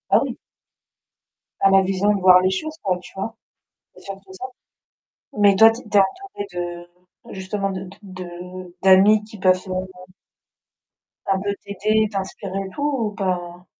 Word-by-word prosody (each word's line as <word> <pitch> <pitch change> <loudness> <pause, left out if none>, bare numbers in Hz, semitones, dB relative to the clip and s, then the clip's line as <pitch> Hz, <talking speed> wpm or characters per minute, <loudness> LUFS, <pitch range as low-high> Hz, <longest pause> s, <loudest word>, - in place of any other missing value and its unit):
ah - - +5
oui! - - -5 1.2
à 195 - +4
la 195 0 +6
vision 195 +2 +1
de - - -2
voir 180 0 +7
les 185 - +2
choses, 310 +12 -3
quoi, 185 -2 0
tu - - -13
vois? 225 +4 -5 0.6
C'est - - -16
surtout 195 -1 -9
ça. 190 - -8 0.9
Mais 205 -1 +5
toi 225 +3 +8
tu 230 - -8
es 220 - -15
tu 205 - +2
es - - +9
entourée 205 - -2
de 175 0 -9
justement, 195 +1 -3
de 185 0 -5 0.2
de 185 -2 -9
de 180 +1 -9
d'amis 195 +3 +6
qui 215 0 -12
peuvent, 185 0 +2
heu 185 0 -3 1.4
ça 195 - +2
peut 200 0 -1
t'aider, 215 +2 +1
t'inspirer 195 -1 -4
et - - -9
tout 285 - -7 0.2
ou 215 -2 -1
pas? 180 -3 -4
190 Hz, 170 wpm, -22 LUFS, 185-205 Hz, 1.4 s, es